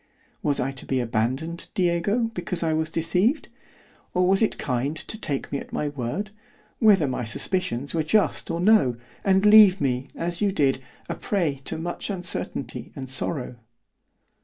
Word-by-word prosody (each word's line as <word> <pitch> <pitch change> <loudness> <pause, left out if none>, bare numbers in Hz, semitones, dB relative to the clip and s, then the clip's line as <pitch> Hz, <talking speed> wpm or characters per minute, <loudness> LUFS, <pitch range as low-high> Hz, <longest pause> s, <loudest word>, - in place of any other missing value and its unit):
—Was 145 -2 +1
I 135 +2 0
to 135 - -9
be 130 - 0
abandoned, 125 +9 -2
Diego, 200 +5 +1
because 175 -2 -2
I 160 -1 +1
was 160 0 0
deceived? 180 - +1 0.7
or 180 0 +3
was 195 +2 +3
it 220 - +1
kind 130 +3 -1
to 220 - -4
take 150 -11 -4
me 140 - -1
at - - -11
my 150 - -1
word, 145 - -4 0.5
whether 200 - +5
my 125 -1 -2
suspicions 135 - -1
were 165 - +1
just 205 +7 +1
or 165 0 -2
no, 175 - +4 0.3
and 195 0 +3
leave 210 -3 +8
me, 130 -1 -1
as 170 +2 0
you 205 -1 +2
did, 135 -7 +1 0.3
a - - -2
prey 165 -9 -1
to - - -3
much 175 +5 -4
uncertainty 175 - -4
and 130 -2 -7
sorrow? 130 -2 -2
165 Hz, 165 wpm, -25 LUFS, 135-195 Hz, 0.7 s, leave